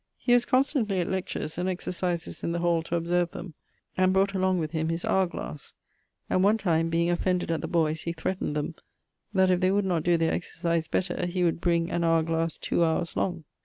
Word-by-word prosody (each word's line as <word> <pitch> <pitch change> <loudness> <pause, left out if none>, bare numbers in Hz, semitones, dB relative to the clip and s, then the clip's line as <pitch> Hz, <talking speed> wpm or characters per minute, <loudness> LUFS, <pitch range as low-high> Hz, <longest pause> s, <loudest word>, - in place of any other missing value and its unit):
He 245 - +1
was 245 0 +4
constantly 255 - +1
at 175 - 0
lectures 175 -4 -3
and 180 +1 0
exercises 180 -1 -3
in 170 - -1
the - - -1
hall 170 -1 +2
to 165 +1 -3
observe 175 +1 +1
them, 175 -1 -8 0.4
and 185 0 +3
brought 195 +1 +2
along 185 -1 +1
with 155 -3 -2
him 160 -1 -1
his 165 +1 -2
hower 190 -1 +2
glasse; 150 -4 -7 0.5
and 185 - +2
one 210 +3 +4
time, 165 -5 +1
being 170 +1 +1
offended 180 0 0
at 165 - -1
the - - -3
boyes, 160 -2 +1
he 170 - -3
threatned 165 -2 -3
them, 150 +2 -2 0.6
that 190 -2 +3
if 180 - +3
they 185 0 +3
would 200 +1 +2
not 175 -4 +1
doe 175 +1 +3
their 165 0 +1
exercise 170 -2 -2
better 175 +1 -1
he 180 +1 -1
'would 170 -1 +1
bring 170 -1 +1
an 170 - 0
hower 165 -1 +3
glass 165 0 -1
two - - -1
howers 165 0 +1
long.' 175 -3 -1
175 Hz, 220 wpm, -27 LUFS, 165-185 Hz, 0.6 s, was